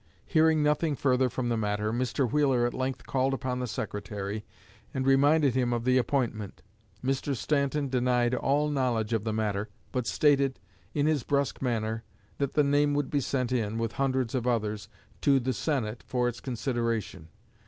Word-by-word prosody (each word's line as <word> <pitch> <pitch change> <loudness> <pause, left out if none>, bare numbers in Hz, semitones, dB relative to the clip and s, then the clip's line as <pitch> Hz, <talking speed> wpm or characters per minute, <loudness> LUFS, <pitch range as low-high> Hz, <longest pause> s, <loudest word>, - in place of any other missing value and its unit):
Hearing 160 -2 +3
nothing 150 +1 +2
further 130 -1 +2
from 120 0 -2
the 115 - +1
matter, 105 0 -1
Mr. 125 +2 0
Wheeler 135 -5 +3
at 120 - -1
length 130 0 -3
called 135 0 +1
upon 125 -1 -3
the 125 - -2
Secretary 105 -1 -4 0.5
and 130 0 -1
reminded 140 +1 +4
him 125 -1 +1
of 120 -1 -1
the 130 0 +4
appointment. 115 -6 -2 0.4
Mr. 135 +1 0
Stanton 140 +2 0
denied 125 -1 +1
all 145 +4 +1
knowledge 120 -5 0
of 110 -1 0
the 110 - 0
matter, 105 -1 -1 0.2
but 125 -2 -2
stated, 140 -3 +2 0.4
in 145 -1 +2
his 155 -3 +2
brusque 140 +3 -1
manner, 115 -3 -1 0.4
that 140 -1 -1
the 150 - +4
name 145 +1 +3
would 145 -2 -1
be 145 - +2
sent 130 -1 -1
in, 110 -3 0
with 115 -1 -1
hundreds 130 -2 0
of 125 -2 -1
others, 110 -3 -1 0.3
to 140 -2 +4
the 130 +1 -1
Senate 120 -4 -2
for 125 -1 +1
its 120 -1 -3
consideration. 115 - -2
125 Hz, 175 wpm, -28 LUFS, 115-140 Hz, 0.5 s, reminded